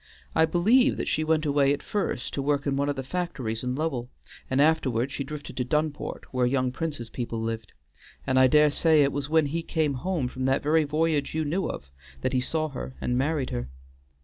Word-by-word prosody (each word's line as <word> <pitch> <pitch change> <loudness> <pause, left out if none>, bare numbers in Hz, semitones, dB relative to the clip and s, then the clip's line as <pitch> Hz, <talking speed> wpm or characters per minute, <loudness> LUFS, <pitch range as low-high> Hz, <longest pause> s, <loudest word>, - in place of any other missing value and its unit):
I 160 - +5
believe 225 - +3
that - - -3
she 155 - +1
went 155 0 +1
away 140 -1 +3
at 145 - -13
first 200 -11 -2
to 140 - -1
work 140 0 0
in 140 -1 0
one 140 +1 0
of 145 - -1
the 135 - -4
factories 130 -8 -3
in 125 0 -1
Lowell, 135 -5 -2 0.4
and 130 - +1
afterward 140 -5 +2
she 140 - -3
drifted 145 +1 -8
to 125 - +1
Dunport, 150 +3 -2
where 125 -1 +2
young 130 0 +1
Prince's 140 -5 -4
people 115 -2 -4
lived, 115 -2 -4 0.5
and 130 0 +2
I 130 - +7
dare 150 +2 +5
say 155 0 +4
it 140 - +2
was 145 +1 -3
when 160 -1 +4
he 160 +4 -2
came 160 -3 0
home 145 +1 -1
from 130 +1 -4
that 135 +1 +1
very 155 +1 +3
voyage 150 -1 0
you 160 -1 0
knew 180 +6 -1
of 65 - -7 0.3
that 130 - -1
he 130 - +2
saw 155 +4 -1
her 130 -1 -7
and 125 - -1
married 140 +1 0
her. - - -3
145 Hz, 220 wpm, -26 LUFS, 130-155 Hz, 0.5 s, I